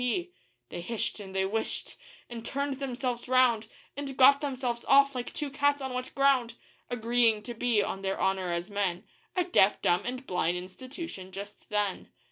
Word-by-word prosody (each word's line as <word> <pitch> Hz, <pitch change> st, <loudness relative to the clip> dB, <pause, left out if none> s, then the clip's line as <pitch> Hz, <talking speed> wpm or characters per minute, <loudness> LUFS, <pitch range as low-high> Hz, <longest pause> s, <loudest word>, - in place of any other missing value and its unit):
P.' 345 Hz, +9 st, -1 dB, 0.4 s
They -, -, -5 dB
hish'd 225 Hz, +4 st, -3 dB
and 190 Hz, -2 st, -9 dB
they 190 Hz, 0 st, +2 dB
whishted, 220 Hz, +3 st, -2 dB, 0.3 s
and 235 Hz, -2 st, -7 dB
turned 280 Hz, +2 st, -2 dB
themselves 255 Hz, -3 st, -3 dB
round, 245 Hz, -4 st, +4 dB, 0.3 s
And 275 Hz, -1 st, -5 dB
got 275 Hz, +2 st, +7 dB
themselves 255 Hz, -4 st, -2 dB
off 275 Hz, 0 st, +6 dB
like 245 Hz, -1 st, -4 dB
two 295 Hz, -2 st, -4 dB
cats 285 Hz, +1 st, +2 dB
on 265 Hz, -2 st, -4 dB
wet 255 Hz, 0 st, -3 dB
ground; 265 Hz, -4 st, +3 dB, 0.3 s
Agreeing 230 Hz, -2 st, +2 dB
to 240 Hz, -, -6 dB
be, 230 Hz, -3 st, +2 dB
on 195 Hz, -, -4 dB
their 195 Hz, 0 st, -2 dB
honour 190 Hz, -2 st, +1 dB
as 170 Hz, +4 st, -3 dB
men, 195 Hz, -2 st, -1 dB, 0.3 s
A 365 Hz, -, +3 dB
deaf 210 Hz, -, +4 dB
dumb 175 Hz, +2 st, +2 dB
and 255 Hz, +2 st, -4 dB
blind 180 Hz, -3 st, 0 dB
institution 190 Hz, -, -8 dB
just 200 Hz, +2 st, -9 dB
then. 205 Hz, -2 st, -1 dB
240 Hz, 175 wpm, -29 LUFS, 200-270 Hz, 0.4 s, got